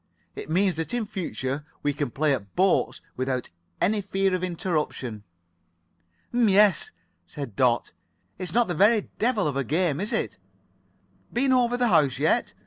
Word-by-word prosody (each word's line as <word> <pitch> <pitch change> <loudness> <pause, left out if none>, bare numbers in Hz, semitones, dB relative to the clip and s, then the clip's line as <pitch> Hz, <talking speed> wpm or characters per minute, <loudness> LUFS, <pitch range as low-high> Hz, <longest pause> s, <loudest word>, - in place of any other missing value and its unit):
It - - -7
means 185 +1 +2
that 165 +9 -3
in 235 -3 -1
future 150 -8 -4 0.2
we 145 - +1
can 145 -2 -2
play 145 +4 +1
at 100 -7 -5
boats 190 0 +2
without 130 0 -2 0.3
any 210 +2 +2
fear 195 -1 0
of 185 0 -1
interruption." 155 - -2 1.1
"M'yes," 210 - +4 0.4
said 140 -9 -7
Dot. 120 -1 +2 0.5
"It's 185 -2 -4
not 235 0 +3
the 175 - -1
very 205 +5 +3
devil 225 -6 +2
of 145 - -2
a 140 - 0
game, 155 +2 0
is 205 +5 -2
it? 220 - -2 0.9
Been 260 +2 +2
over 245 -1 +2
the 245 -1 +2
house 150 -8 +3
yet? - - +1
180 Hz, 155 wpm, -25 LUFS, 140-210 Hz, 1.1 s, M'yes